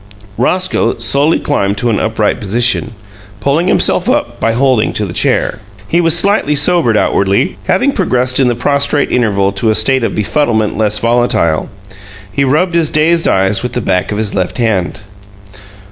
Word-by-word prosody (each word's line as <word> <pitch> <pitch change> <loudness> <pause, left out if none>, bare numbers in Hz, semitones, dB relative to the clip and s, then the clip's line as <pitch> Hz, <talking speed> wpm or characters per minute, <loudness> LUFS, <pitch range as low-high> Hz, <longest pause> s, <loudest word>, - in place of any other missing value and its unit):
Roscoe 125 - 0
slowly 140 +7 +1
climbed 100 -8 -1
to 120 +1 0
an 105 - 0
upright 110 -1 -1
position, 115 +3 0 0.5
pulling 145 +9 0
himself - - +2
up - - -1
by 115 - +1
holding 125 -1 +1
to 105 - -2
the 85 - -7
chair. - - 0 0.3
He 170 +8 +1
was 165 0 +3
slightly 195 -6 +1
sobered 145 -6 +2
outwardly, 100 -2 0
having 280 +2 +1
progressed 130 - 0
in 130 - +3
the 120 - 0
prostrate 140 +3 0
interval 100 -5 +1
to 100 +3 -1
a 110 - +2
state 130 +4 +2
of - - -2
befuddlement 110 0 0
less 105 -1 +2
volatile. 115 -9 0 0.6
He 140 - 0
rubbed 155 +7 +1
his 165 -2 +2
dazed 165 +2 +2
eyes 95 +1 +1
with 125 -1 -5
the - - -1
back 95 -2 -1
of 105 - -3
his 105 -1 -2
left 95 -2 -2
hand. 105 -8 -1
120 Hz, 170 wpm, -12 LUFS, 105-145 Hz, 0.6 s, was